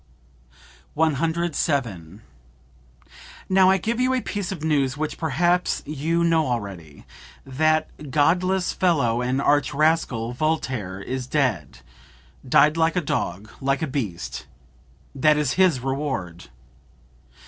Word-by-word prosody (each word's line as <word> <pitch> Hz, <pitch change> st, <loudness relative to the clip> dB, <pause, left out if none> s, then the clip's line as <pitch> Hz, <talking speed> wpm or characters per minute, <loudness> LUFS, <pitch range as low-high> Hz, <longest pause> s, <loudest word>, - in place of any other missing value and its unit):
"Now 160 Hz, 0 st, +3 dB, 2.6 s
I 190 Hz, -, +4 dB
give 225 Hz, +6 st, -2 dB
you 255 Hz, +1 st, +2 dB
a 255 Hz, -, 0 dB
piece 205 Hz, -4 st, -4 dB
of 170 Hz, -5 st, -6 dB
news 140 Hz, -4 st, +1 dB
which 155 Hz, 0 st, -4 dB
perhaps 175 Hz, +4 st, +1 dB
you 155 Hz, +3 st, -1 dB
know 165 Hz, -3 st, +2 dB
already; 95 Hz, -, -5 dB, 0.4 s
that 155 Hz, +1 st, -1 dB
godless 180 Hz, +7 st, +1 dB
fellow 140 Hz, -10 st, +1 dB
and 125 Hz, +2 st, 0 dB
arch 145 Hz, +1 st, +1 dB
rascal, 140 Hz, -7 st, +1 dB
Voltaire, 130 Hz, -, -2 dB
is 125 Hz, +5 st, -5 dB
dead 120 Hz, -, -1 dB, 0.7 s
died 150 Hz, +5 st, +5 dB
like 165 Hz, +1 st, +2 dB
a 180 Hz, -, +1 dB
dog, 110 Hz, -, -3 dB
like 135 Hz, +3 st, 0 dB
a -, -, +2 dB
beast. 115 Hz, -11 st, -5 dB, 0.7 s
That 150 Hz, +2 st, +3 dB
is 150 Hz, -3 st, 0 dB
his 180 Hz, -9 st, +3 dB
reward!" 130 Hz, -, -3 dB
145 Hz, 115 wpm, -23 LUFS, 125-165 Hz, 2.6 s, died